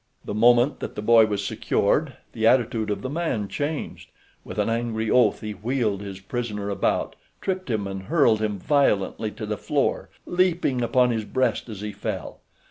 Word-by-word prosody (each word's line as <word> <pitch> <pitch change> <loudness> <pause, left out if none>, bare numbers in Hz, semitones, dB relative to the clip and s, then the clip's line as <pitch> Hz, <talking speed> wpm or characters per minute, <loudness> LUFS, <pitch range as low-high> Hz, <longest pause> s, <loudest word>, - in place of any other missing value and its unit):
The - - -4
moment 120 +5 +4
that - - -6
the 105 - -5
boy 115 0 +6
was 100 -1 -2
secured - - 0 0.2
the 110 0 +1
attitude 115 -3 +2
of 105 - -2
the - - -2
man 145 -10 -1
changed. 145 +7 -4 0.3
With - - -9
an - - +1
angry 115 -1 -1
oath 125 -4 +4
he 105 - -4
wheeled 105 -1 -1
his 100 -2 -7
prisoner 105 -1 -4
about, 100 - 0 0.2
tripped 185 -4 -3
him 110 -4 -1
and 95 -1 -5
hurled 115 - +3
him 105 -2 -1
violently 110 -4 +1
to 110 +1 -7
the 105 0 -3
floor, - - 0 0.2
leaping 175 -8 +1
upon 125 +1 +3
his 110 -2 -1
breast 130 0 0
as 105 -3 -7
he 105 0 -4
fell. - - -5
115 Hz, 180 wpm, -24 LUFS, 105-130 Hz, 0.3 s, boy